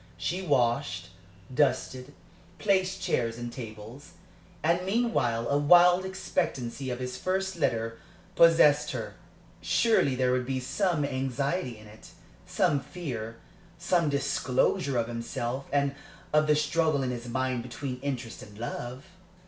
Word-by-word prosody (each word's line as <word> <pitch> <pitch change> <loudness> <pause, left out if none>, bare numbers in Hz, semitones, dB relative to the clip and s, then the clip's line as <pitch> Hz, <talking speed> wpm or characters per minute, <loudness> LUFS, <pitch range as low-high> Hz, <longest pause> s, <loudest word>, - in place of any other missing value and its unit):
She 180 +2 -2
washed, 120 - 0 0.4
dusted, 130 0 0 0.4
placed 190 -1 +1
chairs 115 -10 0
and 120 0 -6
tables. 115 +3 -9 0.5
And 170 +3 +2
meanwhile 190 - +1
a 140 - +2
wild 175 +4 +6
expectancy 155 -9 -2
of 125 - -2
his 125 0 -5
first 190 0 -1
letter 115 -6 -1 0.4
possessed 150 -3 +5
her. - - -5 0.5
Surely 220 - +3
there 125 0 +2
would 125 -1 0
be 130 -1 -1
some 165 +3 0
anxiety 135 0 -2
in 110 - -14
it, 105 +1 -15 0.3
some 145 - +2
fear, 125 -10 -6 0.4
some 175 -2 +1
disclosure 140 +1 +1
of 115 -1 0
himself, 120 +2 -4
and 140 -1 +1 0.4
of 150 0 +4
the 150 - +5
struggle 150 -1 +1
in 125 - -1
his 120 -1 -6
mind 130 0 -1
between 125 +1 -6
interest 130 -4 -4
and 105 -1 -12
love? 120 +3 -5
135 Hz, 130 wpm, -28 LUFS, 120-165 Hz, 0.5 s, wild